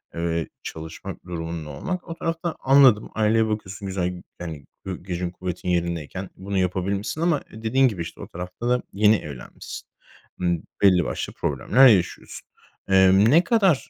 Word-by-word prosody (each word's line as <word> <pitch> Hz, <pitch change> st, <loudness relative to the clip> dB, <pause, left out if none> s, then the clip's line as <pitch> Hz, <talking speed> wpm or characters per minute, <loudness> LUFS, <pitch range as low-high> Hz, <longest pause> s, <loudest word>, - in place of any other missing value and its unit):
eee, 85 Hz, -1 st, -1 dB, 0.2 s
çalışmak 80 Hz, +4 st, -8 dB
durumunda 80 Hz, -3 st, -5 dB
olmak. 180 Hz, -, -4 dB
O 165 Hz, -, -4 dB
tarafta 165 Hz, 0 st, -3 dB
anladım, 135 Hz, -5 st, +5 dB
aileye 110 Hz, 0 st, +3 dB
bakıyorsun, 100 Hz, -2 st, -4 dB
güzel, 90 Hz, -2 st, -2 dB, 0.2 s
yani, 80 Hz, -5 st, -7 dB, 0.2 s
gü 90 Hz, -2 st, -5 dB
gücün 90 Hz, -1 st, -3 dB
kuvvetin 90 Hz, 0 st, -5 dB
yerindeyken 85 Hz, +1 st, -2 dB
bunu 100 Hz, +1 st, -4 dB
yapabilmişsin 95 Hz, -, -1 dB
ama 170 Hz, -4 st, +2 dB
dediğin 115 Hz, +5 st, +2 dB
gibi, 95 Hz, -7 st, -3 dB
işte, 85 Hz, -, -7 dB
o -, -, -7 dB
tarafta 90 Hz, +7 st, -5 dB
da 125 Hz, 0 st, +2 dB
yeni 105 Hz, +2 st, +5 dB
evlenmişsin. 70 Hz, -9 st, -8 dB, 0.5 s
Imm, 85 Hz, -2 st, 0 dB, 0.2 s
belli 90 Hz, -4 st, +5 dB
başlı -, -, -4 dB
problemler 130 Hz, +4 st, +4 dB
yaşıyorsun. 95 Hz, -7 st, +1 dB, 0.4 s
Eee, 95 Hz, -1 st, +6 dB, 0.2 s
ne 170 Hz, +4 st, +6 dB
kadar, 190 Hz, -, +2 dB
95 Hz, 145 wpm, -24 LUFS, 85-115 Hz, 0.5 s, Eee